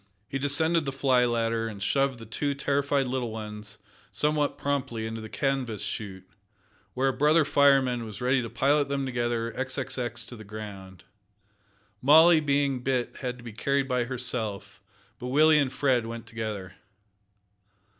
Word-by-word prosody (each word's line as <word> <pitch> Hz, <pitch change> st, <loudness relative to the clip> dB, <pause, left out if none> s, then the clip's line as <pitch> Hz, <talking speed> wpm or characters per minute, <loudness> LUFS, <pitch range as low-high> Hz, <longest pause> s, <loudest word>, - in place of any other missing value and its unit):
He 135 Hz, -, -3 dB
descended 160 Hz, +3 st, +2 dB
the 135 Hz, -, -2 dB
fly 130 Hz, -2 st, +3 dB
ladder, 115 Hz, -1 st, 0 dB
and 110 Hz, -2 st, -7 dB
shoved 135 Hz, +3 st, +1 dB
the 115 Hz, -, -10 dB
two 140 Hz, +6 st, -2 dB
terrified 140 Hz, 0 st, 0 dB
little 125 Hz, -2 st, -2 dB
ones 105 Hz, -1 st, -7 dB, 0.3 s
somewhat 150 Hz, -1 st, 0 dB
promptly 135 Hz, -5 st, -2 dB
into 110 Hz, 0 st, -5 dB
the 110 Hz, -, -8 dB
canvas 130 Hz, -7 st, -2 dB
shoot, 95 Hz, -3 st, -5 dB, 0.7 s
where 135 Hz, +1 st, +2 dB
a -, -, -1 dB
brother 150 Hz, +3 st, +3 dB
fireman 135 Hz, -4 st, +3 dB
was 110 Hz, -3 st, -8 dB
ready 130 Hz, +1 st, +2 dB
to 115 Hz, -, -5 dB
pilot 140 Hz, +3 st, +2 dB
them 140 Hz, -1 st, -1 dB
together 120 Hz, -2 st, -1 dB
xxx 120 Hz, -3 st, -3 dB
to 125 Hz, -, -9 dB
the 110 Hz, -, -10 dB
ground. 100 Hz, -3 st, -9 dB, 1.0 s
Molly 160 Hz, +5 st, +7 dB
being 140 Hz, -3 st, +1 dB
big 125 Hz, -1 st, -1 dB
had 125 Hz, -2 st, -4 dB
to 120 Hz, -, -14 dB
be 115 Hz, -2 st, -8 dB
carried 140 Hz, +4 st, 0 dB
by 125 Hz, -2 st, 0 dB
herself, 120 Hz, -5 st, -4 dB, 0.4 s
but 125 Hz, -, -5 dB
Willie 155 Hz, +4 st, +5 dB
and 135 Hz, -3 st, +1 dB
Fred 125 Hz, -4 st, +1 dB
went 115 Hz, 0 st, -7 dB
together. 110 Hz, -4 st, -5 dB
125 Hz, 155 wpm, -27 LUFS, 115-140 Hz, 1.0 s, Molly